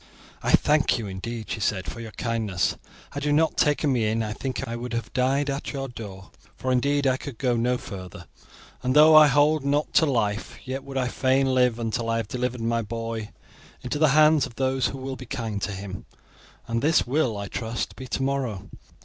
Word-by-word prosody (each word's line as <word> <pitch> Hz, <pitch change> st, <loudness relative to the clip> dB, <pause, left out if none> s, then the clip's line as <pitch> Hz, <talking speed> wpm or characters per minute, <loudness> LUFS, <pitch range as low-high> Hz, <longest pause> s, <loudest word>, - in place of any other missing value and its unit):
"I -, -, -2 dB
thank 150 Hz, -3 st, +4 dB
you, 115 Hz, -, -4 dB
indeed," 110 Hz, +4 st, -6 dB
she -, -, -2 dB
said, 95 Hz, -2 st, -1 dB
"for -, -, -7 dB
your 115 Hz, -1 st, -7 dB
kindness. 110 Hz, -4 st, -1 dB, 0.4 s
Had 145 Hz, 0 st, -5 dB
you 150 Hz, -, +1 dB
not 160 Hz, +2 st, +3 dB
taken 145 Hz, -1 st, +2 dB
me 115 Hz, -4 st, +1 dB
in 110 Hz, +1 st, 0 dB
I 105 Hz, -1 st, -3 dB
think 130 Hz, +3 st, -4 dB
I 115 Hz, -, -4 dB
would 120 Hz, 0 st, -5 dB
have 115 Hz, 0 st, -4 dB
died 135 Hz, +3 st, +1 dB
at 140 Hz, +2 st, -3 dB
your 135 Hz, -1 st, -3 dB
door, 100 Hz, -6 st, -9 dB, 0.2 s
for 130 Hz, -, -2 dB
indeed 140 Hz, +3 st, +2 dB
I 130 Hz, -1 st, +3 dB
could 135 Hz, -3 st, -8 dB
go 125 Hz, -1 st, +1 dB
no 125 Hz, +2 st, +1 dB
further; 95 Hz, -6 st, -9 dB, 0.6 s
and 130 Hz, +1 st, 0 dB
though 155 Hz, +1 st, +8 dB
I 155 Hz, -1 st, +9 dB
hold 145 Hz, +2 st, +3 dB
not 145 Hz, +2 st, 0 dB
to 160 Hz, -, +5 dB
life, 110 Hz, -5 st, -1 dB
yet 130 Hz, +1 st, -4 dB
would 135 Hz, -1 st, -6 dB
I 130 Hz, -1 st, +1 dB
fain 130 Hz, +1 st, +2 dB
live 125 Hz, -2 st, +3 dB
until 115 Hz, 0 st, -2 dB
I 115 Hz, -, +1 dB
have 115 Hz, -2 st, -2 dB
delivered 125 Hz, +1 st, -3 dB
my 115 Hz, 0 st, 0 dB
boy 115 Hz, 0 st, -4 dB, 0.5 s
into 135 Hz, +4 st, -3 dB
the 155 Hz, -, +5 dB
hands 155 Hz, -3 st, +5 dB
of 120 Hz, -, -15 dB
those 130 Hz, 0 st, +1 dB
who 135 Hz, -, -5 dB
will 135 Hz, 0 st, -5 dB
be 130 Hz, -1 st, -10 dB
kind 115 Hz, -6 st, -4 dB
to 105 Hz, -, -2 dB
him, 95 Hz, 0 st, -7 dB, 0.6 s
and 115 Hz, 0 st, -1 dB
this 155 Hz, +2 st, +3 dB
will, 125 Hz, -4 st, 0 dB
I 100 Hz, 0 st, -4 dB
trust, 115 Hz, +2 st, -4 dB
be 130 Hz, -, -8 dB
tomorrow." 130 Hz, -6 st, -2 dB
125 Hz, 210 wpm, -25 LUFS, 115-140 Hz, 0.6 s, I